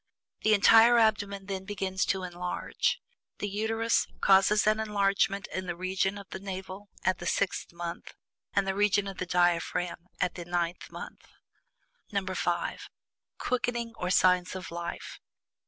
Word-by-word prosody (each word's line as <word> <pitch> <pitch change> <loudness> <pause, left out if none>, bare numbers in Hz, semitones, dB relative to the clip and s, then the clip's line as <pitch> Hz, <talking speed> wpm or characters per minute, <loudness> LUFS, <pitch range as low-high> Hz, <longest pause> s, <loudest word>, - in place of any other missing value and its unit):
The 215 0 +5
entire 225 +3 +7
abdomen 205 -3 +2
then 190 -1 -4
begins 190 -1 -2
to 190 -1 -1
enlarge. 180 0 -2 0.4
The 205 - -3
Uterus 220 +3 +1
causes 195 +2 +5
an 215 +1 +3
enlargement 200 -2 +1
in 185 0 -3
the 175 - -2
region 190 +2 -1
of 200 -1 -10
the - - -5
navel 190 +1 -7
at 185 -1 +1
the 175 - -5
sixth 200 +1 -1
month, 170 0 -7 0.4
and 200 - +1
the 190 - +1
region 205 0 +2
of 195 -1 -7
the 185 - -3
diaphragm 175 0 0
at 180 - +1
the 175 - -7
ninth 175 0 -2
month. - - -9 0.8
(5) 190 -3 -2 0.5
QUICKENING, 240 -2 -1
OR 180 - -3
"SIGNS 180 0 +3
OF 185 -2 -7
LIFE." 170 0 -6
190 Hz, 145 wpm, -29 LUFS, 180-205 Hz, 0.8 s, entire